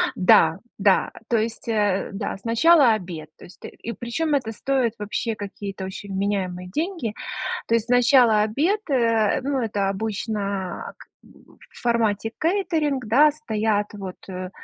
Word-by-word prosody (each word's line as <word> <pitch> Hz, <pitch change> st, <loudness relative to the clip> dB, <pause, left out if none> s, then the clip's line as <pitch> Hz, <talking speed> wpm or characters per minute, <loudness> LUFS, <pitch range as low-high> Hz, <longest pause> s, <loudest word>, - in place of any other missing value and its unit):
Да, 165 Hz, -3 st, +5 dB, 0.2 s
да, 195 Hz, -2 st, +3 dB, 0.2 s
то 235 Hz, -, +3 dB
есть, 225 Hz, +2 st, -3 dB
э, 205 Hz, -3 st, +1 dB
да, 195 Hz, -, -4 dB
сначала 235 Hz, +5 st, +5 dB
обед. 175 Hz, -7 st, -5 dB
То -, -, -13 dB
есть 180 Hz, -, -16 dB
ты -, -, -8 dB
и 230 Hz, -, -8 dB
причем 265 Hz, +8 st, -2 dB
это 250 Hz, -5 st, -1 dB
стоит 255 Hz, 0 st, 0 dB
вообще 215 Hz, +2 st, -2 dB
какие-то 200 Hz, -1 st, -6 dB
очень 195 Hz, +1 st, -7 dB
вменяемые 190 Hz, -2 st, -2 dB
деньги. 310 Hz, -, -3 dB, 0.5 s
То -, -, 0 dB
есть 230 Hz, 0 st, -1 dB
сначала 245 Hz, -3 st, +5 dB
обед, 290 Hz, -, +1 dB
э, 230 Hz, -5 st, +2 dB
ну, 270 Hz, -1 st, -1 dB
это 205 Hz, -3 st, -1 dB
обычно 200 Hz, -2 st, -3 dB
к -, -, -14 dB, 0.2 s
в -, -, -19 dB
формате 225 Hz, -3 st, +1 dB
кейтеринг 315 Hz, -, 0 dB
да, 285 Hz, +8 st, +5 dB
стоят 220 Hz, -8 st, -1 dB
вот, 195 Hz, -3 st, -7 dB
э, 185 Hz, 0 st, -5 dB
220 Hz, 150 wpm, -23 LUFS, 200-250 Hz, 0.5 s, Да